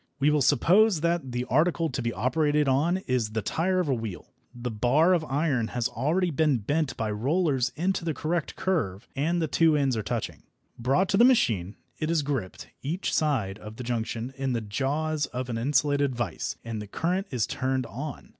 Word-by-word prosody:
We 145 +2 +4
will 150 -1 +2
suppose 180 - +4
that 170 -5 0
the 120 +1 -2
article 165 +5 +2
to 130 -3 -3
be 115 0 -1
operated 145 +7 +1
upon 150 +7 +2
is 120 -4 0
the 110 -2 -1
tyre 185 - 0
of 180 - 0
a 135 - +2
wheel. 110 -6 -6 0.2
The 120 0 -5
bar 130 - +3
of 170 -3 +2
iron 135 -5 0
has 120 0 +1
already 165 +8 0
been 150 -2 +2
bent 145 +7 -1
by 110 -1 -1
rollers 135 - +1
into 180 +3 0
the 160 -3 -2
correct 165 +3 -2
curve 125 - -1
and 165 +6 0
the 160 - 0
two 160 +1 +3
ends 135 -3 +1
are 110 - -1
touching. 100 - -4 0.4
Brought 135 +11 +2
to 195 - +2
the 235 - +6
machine, 110 - +3 0.2
it 155 - -1
is 165 -3 +2
gripped, 135 -10 -4
each 170 +8 -2
side 115 - 0
of 105 0 -9
the 125 - -7
junction, 120 +1 -3
in 135 -1 -1
the 115 - -1
jaws 145 +8 -1
of 125 0 -5
an 115 - -2
insulated 140 +1 +1
vice 115 -8 -3
and 115 -2 -4
the 105 - -8
current 180 - -1
is 125 -6 0
turned 130 0 -1
on. 140 +4 -7
140 Hz, 200 wpm, -27 LUFS, 120-160 Hz, 0.4 s, the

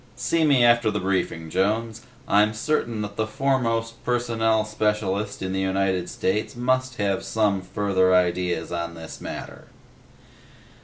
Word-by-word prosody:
"See 125 +7 0
me 140 -5 +5
after 120 -1 +4
the 105 -1 -1
briefing, 90 -4 -2
Jones. 110 +5 0 0.3
I'm 105 +1 +3
certain 115 -4 -1
that 100 -1 -7
the 110 - 0
Foremost 115 -3 -1
Personnel 115 -3 +1
Specialist 105 -2 -1
in 95 0 -3
the 95 - -1
United 95 -1 0
States 105 +6 -1
must 130 +1 0
have 100 -2 -1
some 100 -1 +1
further 95 0 +1
ideas 90 -2 0
on 85 -1 -3
this 80 -1 -9
matter." - - -7
105 Hz, 140 wpm, -24 LUFS, 95-115 Hz, 0.3 s, me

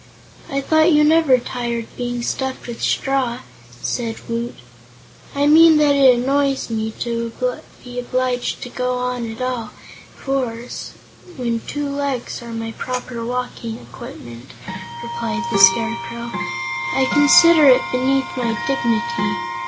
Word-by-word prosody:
"I 275 0 -1
thought 315 +4 +3
you 300 -1 +5
never 310 -4 +5
tired, 240 -1 -4
being 245 -1 -3
stuffed 265 +1 -3
with 235 -1 -7
straw," 255 -3 0 0.4
said 230 -2 -2
Woot. 235 +1 -3 0.8
"I 285 0 +2
mean 320 +1 +7
that 295 -1 +4
it 270 -3 +6
annoys 275 +1 0
me, 220 -1 -1
to 235 -1 -2 0.5
be 245 0 -6
obliged 250 +1 -2
to 245 - -7
go 250 0 -2
on 245 -3 -3
all 250 -4 -3 0.5
fours, 250 -3 -4 0.4
when 235 -2 -1
two 290 0 -3
legs 280 -4 -3
are 235 -1 -9
my 225 0 -4
proper 250 0 -5
walking 240 -2 -4
equipment," 120 0 -11 0.5
replied 235 0 -3
the 195 - +2
Scarecrow. 235 +4 +3 0.6
"I 130 0 +3
consider 305 +1 +7
it 255 -1 +6
beneath 265 +1 +1
my 235 -2 -1
dignity. 115 -4 0
245 Hz, 130 wpm, -20 LUFS, 230-270 Hz, 0.8 s, mean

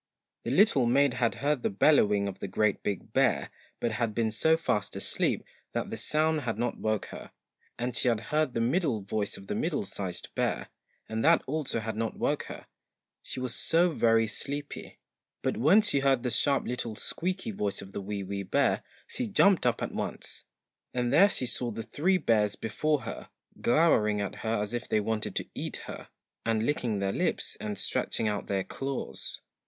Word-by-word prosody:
1 - - -1
The - - 0
little 140 - +5
maid 135 +2 +4
had 120 -2 +1
heard 145 -3 +2
the - - +1
bellowing 105 -3 +4
of 95 - -6
the - - -4
GREAT 105 +2 +1
BIG 100 - -4
BEAR, - - +2 0.3
but 120 - 0
had 115 -1 -1
been 115 -2 +1
so 160 +9 +3
fast 110 - -1
asleep - - 0 0.3
that - - -2
the - - -2
sound 155 0 +2
had 115 -5 -2
not 120 +1 -2
woke 110 -1 0
her; - - -8 0.5
and 120 0 -2
she 125 - +4
had 115 -3 +3
heard 150 -4 +1
the 115 - +1
middle 130 - +1
voice 100 +1 -2
of 95 - -11
the - - -3
MIDDLE - - -1
SIZED - - -5
BEAR, - - -1 0.4
and 110 0 -2
that 165 +2 +5
also 145 -4 -1
had 110 0 -4
not 115 0 -2
woke - - 0
her, - - -9 0.6
she - - -5
was 125 -2 -1
so 170 +6 +3
very 115 -5 +3
sleepy; 140 +6 -5 0.5
but - - 0
when 160 - +5
she 175 -9 +2
heard 135 -3 +2
the 125 - 0
sharp 140 +1 +2
little 120 -3 -3
squeaky 185 - -3
voice 100 - -2
of 100 0 -9
the 100 - -5
WEE 100 0 -4
WEE 100 +1 -4
BEAR, 95 - +1 0.2
she 250 - -3
jumped 200 - +4
up 120 - 0
at - - -3
once, - - -5 0.5
and 125 0 0
there 195 +7 +7
she 130 - +1
saw 125 0 +1
the 115 0 -5
three 185 - +1
bears 105 - +2
before 150 +6 0
her, - - -7 0.3
glowering 115 -7 +3
at 100 -1 -3
her 110 -1 -1
as 105 +2 -6
if 120 - -4
they 110 - +3
wanted 110 +1 -2
to - - -2
eat - - -5
her, - - -8 0.3
and 110 -1 +1
licking 120 -7 0
their 100 0 -1
lips, - - 0
and 105 -1 -4
stretching 110 - 0
out 105 -1 -2
their 95 -1 0
claws. 135 +5 -4
120 Hz, 195 wpm, -29 LUFS, 105-145 Hz, 0.6 s, there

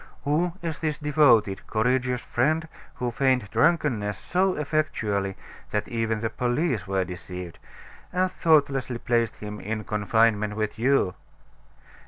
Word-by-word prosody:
Who 165 +4 +1
is 160 -3 -3
this 155 -2 -1
devoted, 135 -10 +3
courageous 125 +2 +1
friend 155 +6 0 0.3
who 125 -1 -2
feigned 130 -4 +1
drunkenness 115 - +2
so 185 +1 +1
effectually 110 -11 -1 0.3
that 105 0 -1
even 115 -2 -1
the 115 -1 -1
police 120 - -1
were 95 -1 0
deceived, 90 0 -8 0.5
and 185 0 +1
thoughtlessly 140 -8 +2
placed 115 -1 0
him 105 0 -7
in 110 +1 -4
confinement 105 0 +1
with 110 0 -3
you? 125 -6 +2
120 Hz, 125 wpm, -26 LUFS, 105-150 Hz, 0.5 s, devoted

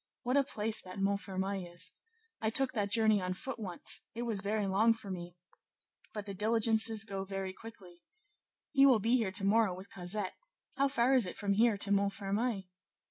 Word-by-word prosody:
What 250 +2 0
a 280 - +5
place 220 -4 0
that 185 +1 -10
Montfermeil 195 -2 -2
is! 175 +1 -2 0.5
I 220 - +1
took 260 +4 +1
that 205 -4 -1
journey 215 -2 +3
on 185 0 -2
foot 265 +5 -6
once; 185 -5 -3
it 235 - -3
was 225 -5 -1
very 210 +1 -1
long 210 +4 +4
for 215 -3 -9
me, 175 -1 -7 0.7
but 210 -2 -6
the 200 - -6
diligences 220 +1 +2
go 195 -3 -5
very 195 -1 -4
quickly! 190 -6 -13 0.7
he 275 -2 +5
will 255 -4 +6
be 225 +4 +2
here 215 -6 -1
to 195 +1 +1
morrow 210 -2 +3
with 190 +2 -11
Cosette: 185 +2 -3 0.4
how 275 0 +3
far 260 -1 +2
is 250 -7 +4
it - - -7
from 200 -1 0
here 220 +1 +3
to 200 0 +2
Montfermeil?" 200 +2 0
205 Hz, 190 wpm, -32 LUFS, 195-225 Hz, 0.7 s, will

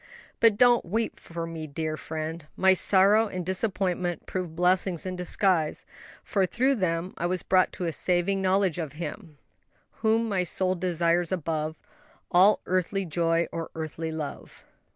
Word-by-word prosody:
"But 225 -3 +4
don't 245 0 +5
weep 220 +6 -2
for 170 0 -6
me, 165 -1 -6
dear 155 +1 -3
friend, 155 0 -6
my 190 0 +5
sorrow 200 +4 +4
and 185 -3 -5
disappointment 185 -3 -1
proved 180 -4 -5
blessings 180 0 +1
in 185 -1 -3
disguise, 180 -2 0 0.4
for 195 -3 0
through 260 +7 +1
them 170 0 -1
I 175 - 0
was 180 -1 -2
brought 185 -1 +3
to 180 - -4
a 165 - -1
saving 180 +4 +2
knowledge 190 -2 +1
of 155 -5 -4
Him 165 0 -7 0.6
"'whom 225 +1 +2
my 195 -4 0
soul 185 +1 0
desires 175 -1 0
above 160 -3 -2 0.6
All 190 +4 +5
earthly 185 +2 -1
joy 165 0 +1
or 165 -1 -5
earthly 160 0 -4
love.'" 155 -2 -7
180 Hz, 155 wpm, -26 LUFS, 165-190 Hz, 0.6 s, don't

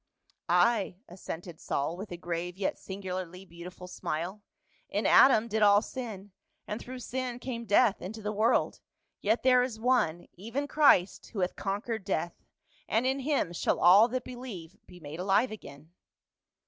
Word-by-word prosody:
"Ay," 220 -6 +3
assented 175 -2 -8
Saul, 145 +4 -2
with 195 +2 -8
a 175 - -5
grave 175 +1 -4
yet 195 - -1
singularly 185 -1 -6
beautiful 180 +1 -10
smile. 180 +3 -4 0.2
" - - -37
In - - -1
Adam 235 -4 +6
did 220 -1 -1
all 205 0 +6
sin, 210 -7 -7 0.4
and 210 - -4
through 255 +1 -8
sin 250 0 -4
came 240 -2 -5
death 205 0 +4
into 215 +3 -7
the 210 - -2
world; 220 +4 +1 0.4
yet 220 +3 +1
there 250 -1 +5
is 245 -3 -3
one, 220 -9 +1
even 230 +10 -4
Christ, 280 - +3
who 200 - -2
hath 180 - -1
conquered 210 +2 -3
death, 185 -3 -3 0.5
and 230 +3 +1
in 265 +1 +1
him 270 - 0
shall - - 0
all 195 +6 +7
that 250 +1 -3
believe 215 -9 -8
be 180 - -14
made 155 +1 -8
alive 200 +6 +2
again." 155 -7 -11
205 Hz, 160 wpm, -29 LUFS, 180-240 Hz, 0.5 s, all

